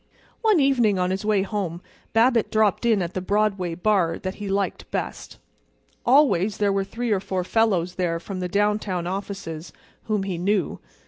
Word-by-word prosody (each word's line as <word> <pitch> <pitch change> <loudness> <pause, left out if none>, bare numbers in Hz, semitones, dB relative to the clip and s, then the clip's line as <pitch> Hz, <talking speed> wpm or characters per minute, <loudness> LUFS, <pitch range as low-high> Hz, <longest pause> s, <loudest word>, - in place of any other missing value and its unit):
One 435 -6 +4
evening 245 -8 +3
on 180 0 0
his 190 +2 -2
way 210 -2 +2
home 195 -5 -3 0.3
Babbitt 230 0 +3
dropped 215 +1 +2
in 215 -5 +3
at 170 +1 -5
the 185 - -2
Broadway 195 -3 0
bar 180 -3 +1
that 185 0 -4
he 205 - -4
liked 195 0 -2
best. - - -5 0.7
Always 240 - +4
there 205 -1 +2
were 195 0 +1
three 235 +4 -3
or 200 - +3
four 190 -1 -2
fellows 185 -4 +1
there 175 -2 -1
from 190 +2 -6
the 180 -1 -3
downtown 205 -2 0
offices 185 -3 -5 0.3
whom 210 -3 0
he 185 -3 -3
knew. 195 -1 0
195 Hz, 175 wpm, -24 LUFS, 180-215 Hz, 0.7 s, One